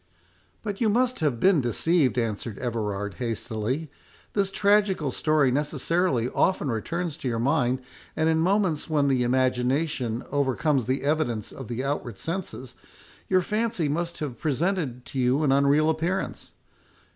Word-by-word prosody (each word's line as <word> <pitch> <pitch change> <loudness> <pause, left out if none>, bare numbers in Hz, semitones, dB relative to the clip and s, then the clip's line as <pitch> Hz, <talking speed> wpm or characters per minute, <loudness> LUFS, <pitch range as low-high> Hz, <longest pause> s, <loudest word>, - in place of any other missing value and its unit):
"But 205 -1 -4
you 225 - +3
must 250 +3 +1
have 145 -8 0
been 185 -2 +4
deceived," 130 +3 +2
answered 110 -2 -2
Everard, 105 -4 -3
hastily; 120 +4 -3 0.4
"this 200 -2 +1
tragical 200 -7 +2
story 150 -2 +2
necessarily 145 -1 0
often 150 -5 +1
returns 165 +8 -3
to 135 - -5
your 115 -2 -1
mind, 125 +1 +1 0.3
and 160 - +1
in 160 0 +3
moments 180 -3 +1
when 145 -3 +2
the 130 -2 +2
imagination 125 0 0
overcomes 140 -1 +1
the 130 +2 0
evidence 140 -8 0
of 135 - -8
the 120 +2 -3
outward 135 -6 -3
senses, 165 - -5 0.5
your 185 -1 +3
fancy 215 -4 0
must 170 +4 -2
have 140 -5 -4
presented 155 -4 -1
to 135 - -5
you 130 +4 +2
an 140 - +3
unreal 140 +3 +4
appearance. 165 +4 -2
145 Hz, 145 wpm, -26 LUFS, 125-170 Hz, 0.5 s, been